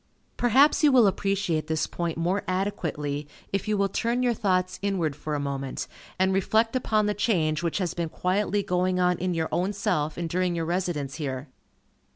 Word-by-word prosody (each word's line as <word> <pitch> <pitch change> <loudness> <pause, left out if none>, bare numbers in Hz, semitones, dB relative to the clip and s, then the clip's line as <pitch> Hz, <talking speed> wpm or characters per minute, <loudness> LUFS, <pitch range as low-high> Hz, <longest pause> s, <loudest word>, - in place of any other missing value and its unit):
Perhaps 265 +7 +4
you 295 - +7
will 250 -4 +6
appreciate 195 -5 0
this 160 -1 0
point 170 -2 -3
more 180 +4 0
adequately, 150 -7 -2 0.3
if 195 - -1
you 210 -1 +1
will 200 0 +2
turn 235 +5 0
your 245 -1 +3
thoughts 185 -4 0
inward 185 -7 0
for 150 +1 -4
a - - -1
moment, 135 -1 -3 0.3
and 190 +1 +2
reflect 220 +5 +2
upon 215 -4 +1
the 210 - +1
change 170 -7 +1
which 170 -2 -1
has 180 -4 -1
been 170 -2 -2
quietly 200 +4 0
going 180 0 0
on 180 -1 +2
in 180 -1 -1
your 160 -1 0
own 185 +4 0
self 180 -7 -1
and 170 -1 -2
during 180 +1 0
your 165 -1 -1
residence 170 -6 -2
here. 140 -2 -4
180 Hz, 190 wpm, -26 LUFS, 160-200 Hz, 0.3 s, you